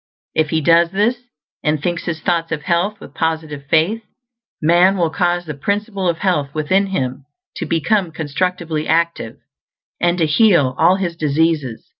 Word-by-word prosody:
If 155 -1 +1
he 160 +1 0
does 170 +2 +4
this, 215 +6 0 0.4
and 150 0 +1
thinks 175 +3 -3
his 160 -2 -3
thoughts 165 -1 -1
of 155 -2 -3
health 185 +5 0
with - - -12
positive 155 -3 -3
FAITH, 170 +10 +2 0.6
man 175 +4 +4
will 170 -3 +1
cause 175 0 0
the 155 - -5
Principle 200 +5 -2
of 170 - -1
Health 155 -7 -1
within 185 +6 +1
him 135 -7 -3 0.3
to - - -4
become 175 +2 +1
constructively 160 +1 -2
active, 165 -8 0 0.6
and 175 0 +1
to 165 - +2
heal 155 - +3
all 175 +3 +5
his 180 -3 -3
diseases. 150 -5 0
165 Hz, 160 wpm, -18 LUFS, 155-185 Hz, 0.6 s, all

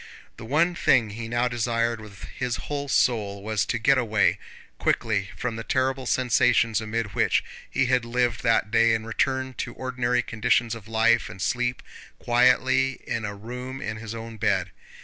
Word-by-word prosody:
The 115 - -9
one 160 +8 +2
thing 115 -10 +3
he 115 +2 -6
now 120 +1 +1
desired 115 -1 -1
with 100 -3 -12
his 125 -3 -2
whole 145 +4 -4
soul 100 -7 +1
was 110 0 -1
to - - 0
get 130 +4 +3
away 110 -4 +2 0.4
quickly 100 -4 0
from 115 -2 -3
the 115 - -5
terrible 130 +1 -1
sensations 115 -3 +2
amid 110 -1 -3
which - - +2 0.3
he 135 - +1
had 125 -1 +2
lived 120 0 0
that 115 -3 +2
day 115 0 +4
and 110 0 -4
return 130 +2 -1
to - - -4
ordinary 125 -1 -1
conditions 115 +1 +1
of 115 -3 -9
life 115 +1 +2
and - - -10
sleep 125 +5 -1 0.3
quietly 125 +2 +3
in 115 -2 -3
a 105 0 -5
room 125 +5 -7
in 110 -3 -4
his 115 0 -7
own 115 0 -8
bed. - - 0
115 Hz, 170 wpm, -25 LUFS, 110-125 Hz, 0.4 s, day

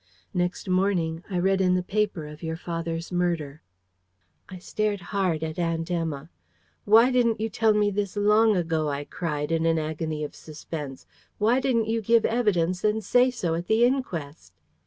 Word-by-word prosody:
Next 180 +1 -2
morning, 180 -3 0
I 185 - -2
read 190 +2 +2
in 180 -1 +3
the 180 - 0
paper 200 -4 -1
of 150 +1 -10
your 160 -1 -3
father's 165 0 -4
murder." 170 -4 -1 0.9
I 185 - -8
stared 210 +3 -2
hard 180 -6 0
at 160 +1 -4
Aunt 165 0 -1
Emma. 160 -3 -3 0.5
"Why 225 +5 +6
didn't 235 -3 +2
you 220 +1 -1
tell 220 +1 +2
me 205 -1 +2
this 200 0 -3
long 210 +1 +4
ago?" 160 -3 0
I 140 0 -3
cried, 150 -1 -3
in 165 0 +1
an 165 0 +2
agony 155 0 -3
of 150 - -5
suspense. 150 -3 -8 0.3
"Why 230 +5 +3
didn't 250 -4 +1
you 225 0 0
give 230 +1 +3
evidence 185 -6 +1
and 215 +1 +1
say 245 +4 +4
so 180 -10 -2
at 170 +2 -3
the 220 +2 +3
inquest?" 170 - -3
180 Hz, 175 wpm, -26 LUFS, 160-210 Hz, 0.9 s, Why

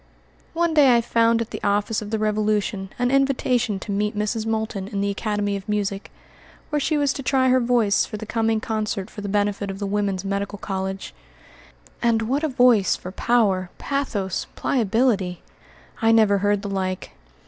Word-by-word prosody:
One 340 0 +1
day 280 -5 +6
I - - +2
found 230 0 +2
at 230 - -5
the - - -6
office 205 +2 +1
of 210 - -7
the 220 - -1
Revolution 210 -2 0
an 245 0 +1
invitation 255 -5 +1
to 210 - -5
meet 210 +1 -1
Mrs. 215 +1 -1
Moulton 220 -3 -2
in 200 -2 -4
the 200 0 0
Academy 205 0 -1
of 200 +2 -7
Music, 200 -1 -2 0.6
where 300 - +1
she 305 +2 0
was 285 -2 +2
to - - -5
try 260 -1 +2
her 255 0 +4
voice 235 -4 +2
for 215 - -5
the 220 - -7
coming 225 0 0
concert 215 -2 -3
for 210 - -8
the 200 - -4
benefit 205 0 0
of 195 - -5
the 200 - -3
Woman's 200 -1 -1
Medical 200 +1 -2
College. 190 0 -4 0.9
And 230 -1 +2
what 270 +7 -1
a - - +2
voice 245 -7 +4
for 180 - -8
power, 195 -4 +1
pathos, 220 -10 -2
pliability! 215 -6 0 0.6
I 225 0 +4
never 215 -3 +4
heard 205 +1 +1
the 200 - -4
like. 185 -1 -3
215 Hz, 180 wpm, -23 LUFS, 200-235 Hz, 0.9 s, day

